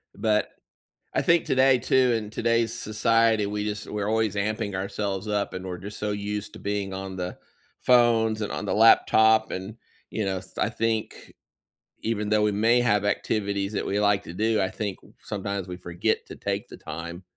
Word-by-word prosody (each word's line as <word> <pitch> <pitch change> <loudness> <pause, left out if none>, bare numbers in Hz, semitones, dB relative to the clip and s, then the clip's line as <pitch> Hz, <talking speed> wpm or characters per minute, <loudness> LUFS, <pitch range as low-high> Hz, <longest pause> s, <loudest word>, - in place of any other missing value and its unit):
But, 105 -1 +1 0.6
I - - +1
think 170 -1 +3
today, 130 -1 +4
too, 130 0 +3
in 105 -1 -5
today's 115 0 +1
society, 115 -1 +2
we 105 0 -3
just 105 0 -4
we're 105 -1 -2
always 110 -2 +1
amping 105 0 -1
ourselves 100 +1 -3
up, 105 -1 -1
and 95 0 -5
we're 90 -1 -5
just 100 +3 -8
so 105 0 -2
used 105 0 -4
to - - -11
being 100 -1 -2
on 95 0 -6
the 90 0 -4 0.4
phones, 115 -3 +4
and 105 - -3
on - - -4
the 100 - -1
laptop, 110 0 +5
and, 95 +4 -5 0.3
you 110 - -2
know, 95 -1 -1
s 95 0 -14
I - - +1
think, 115 -1 -3 0.7
even 105 -2 -1
though 105 0 +3
we 105 - +3
may 115 +4 +3
have 105 -4 +2
activities 100 -1 -1
that - - -2
we 100 +1 0
like 100 -1 +2
to - - -8
do, 110 +1 +1
I 95 -1 0
think, 100 -2 -4
uh, - - -17
sometimes 100 -2 -4
we 90 - -5
forget 85 -1 -2
to - - -9
take - - -3
the - - -10
time 85 +2 -7
105 Hz, 195 wpm, -26 LUFS, 100-110 Hz, 0.7 s, laptop